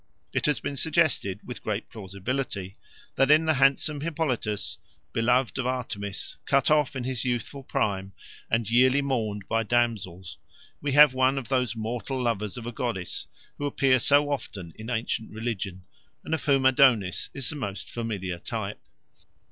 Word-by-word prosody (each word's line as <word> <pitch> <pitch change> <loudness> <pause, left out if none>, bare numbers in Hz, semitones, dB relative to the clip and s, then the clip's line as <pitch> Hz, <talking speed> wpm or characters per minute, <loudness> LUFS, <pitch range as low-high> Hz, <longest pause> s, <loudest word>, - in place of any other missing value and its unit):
It - - +1
has 150 - +2
been 140 - -4
suggested, 150 - +2
with 125 - -7
great 105 0 -3
plausibility, 100 -1 -4 0.4
that 135 0 +4
in 155 +2 +6
the 160 - +3
handsome 140 +2 +3
Hippolytus, 145 -10 -2 0.3
beloved 125 +3 +2
of 125 - 0
Artemis, 110 -6 -4
cut 140 +1 +3
off 150 -3 +3
in 130 - -3
his 125 -2 -1
youthful 125 +2 -2
prime, 95 -6 -1 0.4
and 115 -1 +1
yearly 130 +4 +4
mourned 110 -7 -2
by 115 - +1
damsels, 100 -8 -1 0.4
we 145 -1 -1
have 145 -1 +8
one 130 +1 +2
of 130 -4 -4
those 125 -4 +1
mortal 120 +4 -3
lovers 115 -3 -1
of 120 - -7
a 120 - -3
goddess 115 -8 -3 0.3
who 145 - -1
appear 135 -2 +3
so 145 +4 +4
often 95 - -5
in 110 +2 -8
ancient 115 -1 -2
religion, 105 -5 -4 0.4
and - - -4
of 160 - -2
whom 135 -3 +3
Adonis 120 - +4
is 140 +1 +1
the - - -5
most 100 -8 -5
familiar 100 -7 -4
type. - - -5
120 Hz, 160 wpm, -27 LUFS, 105-135 Hz, 0.4 s, have